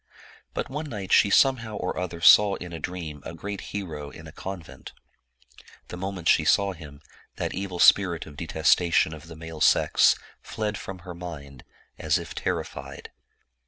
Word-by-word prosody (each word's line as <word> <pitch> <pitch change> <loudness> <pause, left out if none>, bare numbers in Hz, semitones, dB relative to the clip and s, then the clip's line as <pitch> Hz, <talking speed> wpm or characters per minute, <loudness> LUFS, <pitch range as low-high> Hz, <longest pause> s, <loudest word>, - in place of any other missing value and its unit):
But - - -2
one 150 +3 -5
night 100 -6 -6
she 100 - +6
somehow 115 -2 +3
or - - -3
other 85 -2 -4
saw 100 +5 +7
in 90 -1 -8
a 85 - -5
dream 80 -4 -6
a 80 - -7
great 100 +4 -6
hero 80 -8 -5
in 80 - -12
a 80 - -10
convent. 90 -1 -9 1.0
The - - -6
moment 90 -2 -5
she 80 - +5
saw 100 +6 +3
him, 75 -4 -12 0.3
that - - -3
evil 95 -2 -4
spirit 85 -3 +5
of 75 - -12
detestation 80 +1 +2
of 80 0 -11
the 80 - -10
male 80 -1 -9
sex - - +5 0.3
fled 105 -1 -3
from 95 -2 -7
her 90 - -7
mind, 75 -6 -9 0.4
as - - +2
if - - -7
terrified. - - -5
90 Hz, 165 wpm, -26 LUFS, 80-100 Hz, 1.0 s, saw